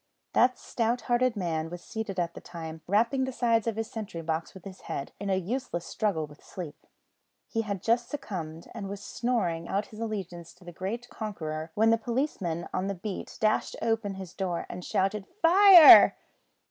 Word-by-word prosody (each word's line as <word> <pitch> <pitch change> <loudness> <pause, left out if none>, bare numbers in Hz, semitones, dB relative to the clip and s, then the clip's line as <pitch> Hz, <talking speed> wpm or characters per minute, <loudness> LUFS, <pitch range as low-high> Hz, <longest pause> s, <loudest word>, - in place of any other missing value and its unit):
That 250 0 +4
stout 235 +1 -1
hearted 245 0 +1
man 165 -4 -2
was 175 0 -8
seated 220 -4 -5
at 170 -1 -1
the - - -10
time 160 -2 -8
rapping 230 +7 +2
the 260 - -4
sides 235 -2 +1
of 225 - 0
his 225 0 -3
sentry 205 -7 -6
box 160 +2 -3
with 190 - -12
his 190 -1 -10
head, 140 - -5
in 200 0 -4
a 190 - +3
useless 190 -2 -3
struggle 200 -8 -1
with 145 0 -17
sleep. 175 -6 -9 0.6
He 225 - -1
had 200 -4 -4
just 235 +1 +1
succumbed, 170 - -6
and 200 -4 -6
was 200 0 -6
snoring 185 -11 -1
out 200 +2 -1
his 215 - -10
allegiance 185 -7 -5
to 180 - -20
the 175 - -9
great 220 +8 -4
conqueror, 160 -7 -5
when 220 +2 +4
the 230 - +3
policeman 225 - -2
on 185 +1 -1
the 200 - -2
beat 190 +2 -6
dashed 215 0 +1
open 225 -3 -1
his 190 -2 -8
door 180 -3 -3
and 180 - -7
shouted 195 +2 -1 0.2
"Fire!" 360 -1 +9
200 Hz, 185 wpm, -28 LUFS, 175-230 Hz, 0.6 s, Fire